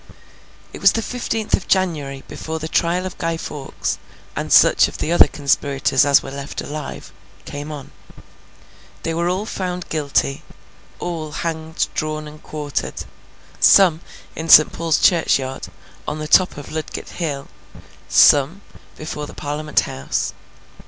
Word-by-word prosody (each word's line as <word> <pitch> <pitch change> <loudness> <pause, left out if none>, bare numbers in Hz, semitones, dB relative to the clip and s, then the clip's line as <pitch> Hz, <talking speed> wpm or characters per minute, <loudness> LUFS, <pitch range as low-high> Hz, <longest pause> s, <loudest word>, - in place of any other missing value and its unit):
It - - -9
was - - +6
the 225 - -1
fifteenth 225 -3 -3
of - - +1
January, 150 -8 0
before 160 0 -5
the 160 0 -5
trial 175 +3 +1
of 185 - -7
Guy 165 -1 -1
Fawkes, 145 -4 -4 0.4
and - - -4
such - - +6
of - - -9
the 160 - -2
other 175 - +7
conspirators 140 -1 +1
as 140 - +5
were 135 - -7
left 140 +1 -6
alive, 150 0 -7 0.3
came 145 +2 -6
on. 145 -3 -8 1.1
They 165 - -1
were 170 +1 0
all 190 +4 -1
found 180 -4 -4
guilty, 140 -3 0 0.6
all 165 -3 -4
hanged, 160 +1 -3
drawn, 155 0 -3
and 150 0 -12
quartered: 150 -2 -4 0.5
some, 180 -5 +6 0.4
in 160 +1 -5
St. 155 - +8
Paul's 165 -2 +1
Churchyard, 135 -7 +2 0.4
on 150 - -3
the 155 0 -5
top 180 +2 +4
of 145 - -9
Ludgate 155 -1 -5
hill; 145 -5 -4 0.6
some, 145 +7 +5 0.4
before 150 -1 -5
the - - -12
Parliament 150 +1 -1
House. 65 +1 -3
155 Hz, 145 wpm, -20 LUFS, 145-170 Hz, 1.1 s, St